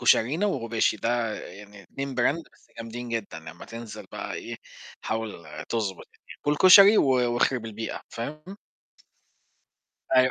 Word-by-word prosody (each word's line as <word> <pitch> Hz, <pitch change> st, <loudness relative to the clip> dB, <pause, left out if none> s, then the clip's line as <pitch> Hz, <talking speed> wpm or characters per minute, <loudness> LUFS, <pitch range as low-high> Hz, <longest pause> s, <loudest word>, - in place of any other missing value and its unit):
كشرينا 135 Hz, -, +3 dB
وغباشي، 115 Hz, -, 0 dB
ده 115 Hz, 0 st, -1 dB
يعني 100 Hz, +2 st, -12 dB
2 135 Hz, +8 st, -6 dB
brand 140 Hz, +7 st, +1 dB
بس -, -, -26 dB
جامدين 115 Hz, +2 st, -6 dB
جدًا. 110 Hz, -8 st, -4 dB
لما 80 Hz, +1 st, -11 dB
تنزل 115 Hz, -1 st, -9 dB
بقى -, -, -5 dB
إيه -, -, -6 dB, 0.5 s
حاول 110 Hz, 0 st, -2 dB, 0.4 s
تضبط 105 Hz, -5 st, -2 dB
الدنيا. -, -, -16 dB
كُل 145 Hz, 0 st, +1 dB
كشري 200 Hz, +4 st, +9 dB
و -, -, +5 dB
واخرب 125 Hz, -1 st, +2 dB
البيئة، 110 Hz, +1 st, -5 dB
فاهم؟ 150 Hz, +7 st, -6 dB, 1.7 s
أيوه. 130 Hz, 0 st, +6 dB
115 Hz, 135 wpm, -26 LUFS, 110-135 Hz, 1.7 s, كشري